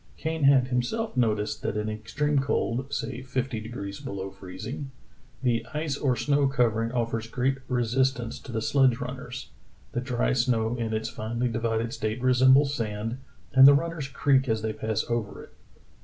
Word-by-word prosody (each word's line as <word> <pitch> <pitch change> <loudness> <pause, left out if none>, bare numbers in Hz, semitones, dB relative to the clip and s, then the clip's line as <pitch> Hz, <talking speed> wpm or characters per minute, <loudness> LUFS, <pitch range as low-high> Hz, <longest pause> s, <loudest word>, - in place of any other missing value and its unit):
Kane 160 -2 -1
had 135 -2 +5
himself 130 - -1
noticed 110 -4 0
that - - -2
in 105 0 -1
extreme 135 +7 -1
cold, 135 -1 -1
say 130 -3 -3
fifty 130 -2 -2
degrees 105 -3 -6
below 95 -1 -5
free2ing,*'the 120 +3 -5
ice 150 -2 -1
or 135 -3 +1
snow 145 +2 +2
covering 115 -4 +1
offers 115 -2 -1
great 130 +3 0
resistance 125 0 0
to - - -10
the 110 -1 -2
sledge 130 -3 +3
runners. 125 -1 -6 0.4
The 120 - -2
dry 125 -1 0
snow 120 -2 +1
in 115 -2 -2
its 110 +1 -2
finely 120 +3 -2
di 115 0 -2
vided 115 0 -1
state 110 +2 -2
resembles 130 +3 +5
sand, 115 0 -3 0.3
and 135 0 +9
the 140 - +8
runners 165 -1 -2
creak 135 -1 +2
as 110 -1 0
they 110 -1 -1
pass 110 0 -2
over 115 -3 -3
it." - - -16
125 Hz, 165 wpm, -27 LUFS, 110-135 Hz, 0.4 s, and